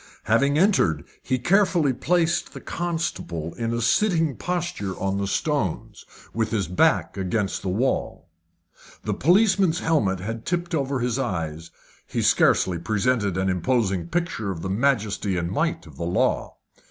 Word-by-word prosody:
Having 140 +6 +2
entered, 155 - +2 0.2
he 130 - -1
carefully 170 - +3
placed 170 +5 0
the - - -7
constable 160 - -3
in 115 -1 -3
a 115 0 -1
sitting 160 - +2
posture 170 - -3
on 95 0 -1
the 100 - -1
stones, 140 - -2 0.3
with 115 -1 0
his 105 -6 -1
back 90 +2 +2
against 95 +1 -1
the 95 - -3
wall. 105 -3 -1 0.8
The - - -1
policeman's 190 - +3
helmet 110 - +1
had 115 +4 -5
tipped 175 0 -2
over 140 -4 -1
his 125 +1 -1
eyes 80 - -3 0.4
he - - -2
scarcely 90 -3 +3
presented 105 +1 0
an 95 +1 0
imposing 95 -1 0
picture 170 - -2
of 85 -4 -5
the 95 - -2
majesty 105 -5 0
and 85 -1 -2
might - - -1
of - - -14
the - - -4
law. 90 +2 0
115 Hz, 150 wpm, -24 LUFS, -, 0.8 s, carefully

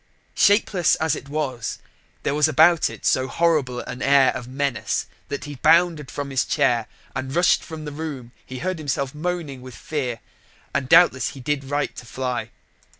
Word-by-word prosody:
Shapeless 200 -5 +3
as 160 -1 0
it 140 - -9
was, 135 -6 -3 0.5
there - - 0
was 150 +1 +3
about 160 +3 +5
it - - -10
so 130 0 +2
horrible 145 -7 +1
an 125 +1 -7
air 135 -1 +5
of 125 -2 -6
menace 130 -5 -1 0.2
that 140 - -4
as - - -8
he 145 0 -7
bounded 165 -3 +4
from 140 -1 -5
his 135 -2 +2
chair 115 -2 +1 0.3
and 130 +1 -4
rushed 175 +1 +3
from 160 -1 -8
the 150 - -5
room 145 -5 -6
he 130 - -8
heard 185 +4 -3
himself 140 -2 -2
moaning 155 -4 -4
with 130 -1 -10
fear: 130 -7 -3 0.5
and 130 - -1
doubtless 155 -7 +5
he - - -8
did 140 +1 -2
right 145 +1 -2
to 125 - -9
fly. 125 +2 -3
140 Hz, 180 wpm, -23 LUFS, 130-160 Hz, 0.5 s, about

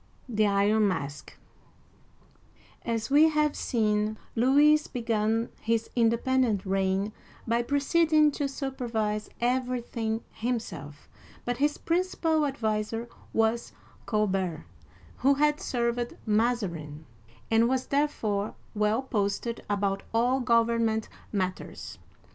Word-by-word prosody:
THE 215 -3 +2
IRON 205 +2 +3
MASK 145 -6 -4 0.7
' - - -31
AS 225 +2 -2
we 305 +3 +7
have 300 -1 +1
seen, 215 -2 0 0.2
Louis 290 +5 +5
began 225 -1 0
his 230 0 0
independent 235 -2 +2
reign 195 +2 0 0.3
by 235 +1 +2
proceeding 305 +3 +3
to 285 0 -2
supervise 235 -6 -3
everything 240 -2 -1
himself, 165 - -5 0.4
but 245 0 -1
his 290 +2 +1
principal 330 -3 +1
adviser 225 -2 -2 0.2
was 225 +1 0 0.3
Colbert, 190 -7 0 0.5
who 275 +1 +3
had 295 +1 +2
served 240 -1 -2
Mazarin, 200 -10 -1 0.5
and 225 +1 +4
was 260 0 0
therefore 220 -8 -1 0.2
well 210 +4 +1
posted 220 0 -2
about 200 -1 0
all 245 +3 +3
government 230 -2 +2 0.2
matters. 185 -3 -4
230 Hz, 100 wpm, -28 LUFS, 210-260 Hz, 0.7 s, we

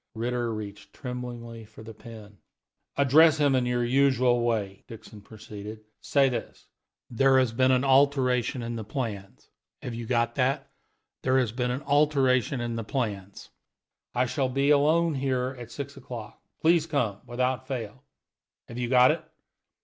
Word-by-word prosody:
Ritter 120 +1 -2
reached 100 -2 -8
tremblingly 120 -3 -7
for 110 +1 -14
the 110 0 -10
pen. 105 -3 -13 0.6
"Address 150 +3 +5
him 145 -2 +3
in 125 -2 +1
your 120 0 0
usual 130 -1 +3
way," 105 -5 -2
Hewitt 110 -2 -12
proceeded. 110 0 -10 0.2
"Say 140 -1 +3
this: 120 -3 -5 0.5
'There 135 +2 +4
has 130 -3 +3
been 130 +3 +2
an 130 0 +3
alteration 130 -2 +2
in 115 0 -4
the 110 - -5
plans.' 105 -5 -6 0.3
Have 125 - -5
you 115 0 -6
got 115 -1 +1
that? 135 +2 -1 0.5
'There 130 0 +2
has 125 -5 +1
been 125 +1 -2
an 125 +4 -3
alteration 140 -4 +2
in 120 -1 -3
the 115 - -3
plans. 105 -5 -4 0.6
I 125 +1 +2
shall 130 +1 -1
be 140 +3 +1
alone 155 +3 +3
here 130 -1 -1
at 120 -1 -9
six 140 +3 -7
o'clock. 120 -5 -9 0.2
Please 165 0 +3
come, 115 -10 -1
without 125 +2 -1
fail.' 130 -1 -6 0.7
Have 120 - -7
you 120 -1 -2
got 125 0 +6
it? - - -4
125 Hz, 155 wpm, -27 LUFS, 115-135 Hz, 0.7 s, got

